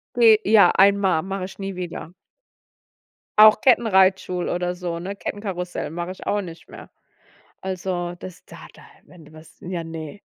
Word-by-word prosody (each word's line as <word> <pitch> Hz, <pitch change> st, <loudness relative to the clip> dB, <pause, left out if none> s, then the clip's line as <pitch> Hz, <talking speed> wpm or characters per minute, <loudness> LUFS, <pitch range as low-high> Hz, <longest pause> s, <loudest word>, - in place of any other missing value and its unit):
Be 225 Hz, -3 st, +6 dB
ja, 205 Hz, -4 st, +5 dB
einmal. 195 Hz, -4 st, +3 dB
Mache 190 Hz, -1 st, -4 dB
ich 190 Hz, +1 st, -12 dB
nie 195 Hz, -1 st, -5 dB
wieder. 175 Hz, -2 st, -7 dB, 1.3 s
Auch 215 Hz, 0 st, +8 dB
Kettenreitschul 190 Hz, -7 st, +2 dB
oder 180 Hz, 0 st, -2 dB
so, 175 Hz, -2 st, -5 dB
ne? 190 Hz, +4 st, -6 dB
Kettenkarussell 180 Hz, -7 st, -5 dB
mache 175 Hz, +2 st, -5 dB
ich 185 Hz, -, -11 dB
auch 205 Hz, -, 0 dB
nicht 170 Hz, -3 st, -11 dB
mehr. -, -, -12 dB, 0.7 s
Also 180 Hz, -2 st, -4 dB
das 185 Hz, -1 st, -11 dB
da -, -, -13 dB
da -, -, -17 dB, 0.2 s
wenn 170 Hz, -3 st, -17 dB
du 155 Hz, -, -18 dB
was 155 Hz, 0 st, -16 dB
ja 175 Hz, -1 st, -5 dB
ne, 165 Hz, +3 st, -8 dB
185 Hz, 155 wpm, -22 LUFS, 175-195 Hz, 1.3 s, Auch